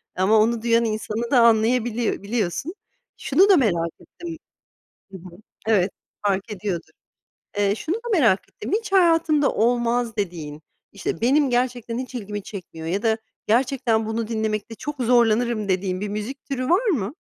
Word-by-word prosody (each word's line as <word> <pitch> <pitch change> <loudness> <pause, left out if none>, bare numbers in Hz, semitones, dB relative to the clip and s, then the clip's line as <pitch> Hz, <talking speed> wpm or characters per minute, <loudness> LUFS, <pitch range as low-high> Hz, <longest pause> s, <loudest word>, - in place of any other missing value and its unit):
ama 200 +4 +4
onu 225 +1 +2
duyan 230 0 +3
insanı 220 +2 -3
da 250 - +5
anlayabiliy 230 0 +2
biliyorsun. 220 - -2 0.4
Şunu 395 +2 +3
da 380 - +7
merak 170 -10 +1
ettim. 335 -2 -9 0.8
Hı - - -7
hı 180 +1 -12 0.4
Evet, 200 -4 +3 0.4
fark 200 +2 0
ediyordur. 195 -4 -4 0.7
Eee, 200 0 +2
şunu 330 - -3
da 475 +1 -6
merak 230 - +4
ettim. - - -8
Hiç 445 -4 -7
hayatında 330 -5 +4
olmaz 235 0 +1
dediğin, 160 -6 -4 0.3
işte, 200 +2 -4
benim 275 +3 +3
gerçekten 245 -1 -1
hiç 255 0 -6
ilgimi 205 -3 -5
çekmiyor, 165 -5 -8
ya 195 +5 -1
da 220 0 +2 0.3
gerçekten 235 -1 +1
bunu 220 0 -2
dinlemekte 220 -1 -2
çok 295 0 -5
zorlanırım 235 -2 +2
dediğin 185 0 -1
bir 210 - -2
müzik 215 +7 -5
türü 255 -1 -3
var 380 +8 +3
mı? 255 - 0
230 Hz, 155 wpm, -23 LUFS, 205-255 Hz, 0.8 s, da